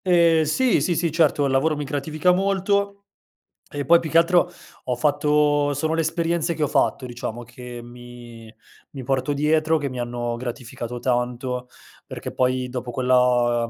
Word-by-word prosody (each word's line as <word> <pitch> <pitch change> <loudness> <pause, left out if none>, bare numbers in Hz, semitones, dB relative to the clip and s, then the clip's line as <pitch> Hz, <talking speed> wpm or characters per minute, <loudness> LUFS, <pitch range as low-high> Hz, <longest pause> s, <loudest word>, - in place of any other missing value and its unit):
Eh 170 -3 +4
sì, 245 - +2
sì, 175 - 0
sì, 165 0 0
certo, 150 -3 +2
il 135 - 0
lavoro 145 +4 +2
mi 150 - -3
gratifica 150 +5 0
molto. 200 +2 +1 0.7
E 145 -1 -4
poi 170 +5 +5
più 160 -2 -6
che 165 - +4
altro 175 +1 +3 0.3
ho 125 - -1
fatto 145 +1 +2
sono 155 +3 -1
le 165 - +1
esperienze 165 +1 -1
che 155 - -5
ho - - +2
fatto, 130 - 0
diciamo, 120 -1 -6
che 120 0 -10
mi 120 -2 -12 0.4
mi 135 - -8
porto 135 +3 0
dietro, 155 +2 +2
che 145 -2 -3
mi 125 -2 -6
hanno 120 0 -3
gratificato 120 -1 -6
tanto, 125 0 -2 0.4
perché - - -7
poi 130 0 0
dopo 125 -1 -5
quella 125 -2 +2
140 Hz, 165 wpm, -23 LUFS, 125-160 Hz, 0.7 s, poi